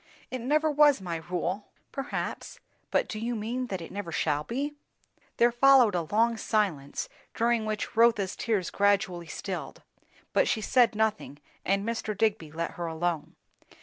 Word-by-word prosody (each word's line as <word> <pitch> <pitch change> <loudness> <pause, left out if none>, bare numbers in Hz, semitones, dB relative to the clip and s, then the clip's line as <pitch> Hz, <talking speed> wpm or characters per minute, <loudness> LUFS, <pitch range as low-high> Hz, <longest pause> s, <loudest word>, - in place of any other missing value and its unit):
"It 255 -1 -3
never 305 +5 +2
was 295 -3 +5
my 175 -3 -4
rule." 180 +4 -3 0.2
"Perhaps. 275 0 -4 0.3
But - - +1
do 215 - -5
you 235 +2 -2
mean 240 +4 -3
that 190 -5 -4
it 165 - -8
never 195 -3 -5
shall 150 -2 0
be?" 275 - -3 0.6
There 240 +1 +5
followed 250 -3 +6
a 170 -3 -1
long 230 +2 +3
silence, 185 -12 -1 0.3
during 230 -1 +1
which 215 -1 -3
Rotha's 225 -4 +3
tears 205 -6 -1
gradually 200 -4 +1
stilled; - - -6 0.5
but - - +3
she - - +1
said 235 +2 +3
nothing, 215 -9 -1 0.3
and 195 +2 0
Mr. 220 -3 -2
Digby 205 -8 0
let 165 +2 -3
her 170 -1 -5
alone. 165 -1 -2
215 Hz, 155 wpm, -28 LUFS, 175-235 Hz, 0.6 s, followed